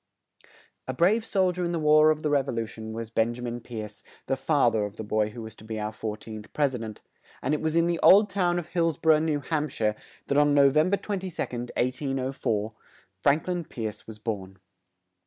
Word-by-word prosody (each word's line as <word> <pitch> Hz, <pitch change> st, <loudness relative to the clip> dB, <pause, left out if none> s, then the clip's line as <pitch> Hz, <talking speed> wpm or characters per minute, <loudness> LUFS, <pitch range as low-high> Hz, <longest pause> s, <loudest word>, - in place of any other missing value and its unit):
A 130 Hz, -, -3 dB
brave 200 Hz, -, +3 dB
sol 190 Hz, -4 st, +2 dB
dier 180 Hz, 0 st, -3 dB
in 175 Hz, 0 st, -1 dB
the -, -, 0 dB
War 155 Hz, 0 st, +5 dB
of 155 Hz, 0 st, 0 dB
the 150 Hz, -, +1 dB
Rev 140 Hz, -2 st, +2 dB
o -, -, 0 dB
lu 115 Hz, -1 st, -2 dB
tion 110 Hz, 0 st, -8 dB
was 115 Hz, 0 st, -6 dB
Ben 115 Hz, +1 st, +1 dB
ja 125 Hz, -, -8 dB
min 120 Hz, 0 st, -3 dB
Pierce, 110 Hz, -3 st, -7 dB, 0.2 s
the 135 Hz, -, 0 dB
fa 145 Hz, -1 st, +2 dB
ther 110 Hz, -2 st, 0 dB
of 105 Hz, 0 st, -7 dB
the 110 Hz, -, -6 dB
boy 105 Hz, 0 st, 0 dB
who 115 Hz, +2 st, -8 dB
was 110 Hz, 0 st, -9 dB
to -, -, -14 dB
be 110 Hz, 0 st, -5 dB
our 105 Hz, 0 st, -2 dB
four 110 Hz, -1 st, -5 dB
teenth 110 Hz, -1 st, -10 dB
pres 145 Hz, -3 st, +1 dB
i 125 Hz, -, -3 dB
dent; 110 Hz, -2 st, -7 dB, 0.4 s
and 135 Hz, -, +1 dB
it 150 Hz, -, 0 dB
was 160 Hz, 0 st, -1 dB
in 170 Hz, 0 st, +4 dB
the 170 Hz, -1 st, 0 dB
old 205 Hz, +2 st, +7 dB
town 180 Hz, -3 st, +1 dB
of 170 Hz, -1 st, -4 dB
Hills 165 Hz, -4 st, +1 dB
bor 160 Hz, -1 st, +5 dB
ough, 155 Hz, -, +3 dB
New 155 Hz, -2 st, 0 dB
Hamp 150 Hz, +1 st, -1 dB
shire, 105 Hz, -4 st, 0 dB, 0.3 s
that, 140 Hz, -, +2 dB
on 145 Hz, -1 st, +4 dB
No 140 Hz, -1 st, +6 dB
vem 155 Hz, +5 st, +3 dB
ber 200 Hz, -, +2 dB
22d, 180 Hz, -, -4 dB
1804, 130 Hz, -4 st, -1 dB, 0.5 s
Frank 145 Hz, +5 st, +2 dB
lin 175 Hz, -1 st, -1 dB
Pierce 110 Hz, -8 st, -6 dB
was 110 Hz, -1 st, -9 dB
born. 100 Hz, -4 st, -5 dB
135 Hz, 235 wpm, -27 LUFS, 110-160 Hz, 0.5 s, old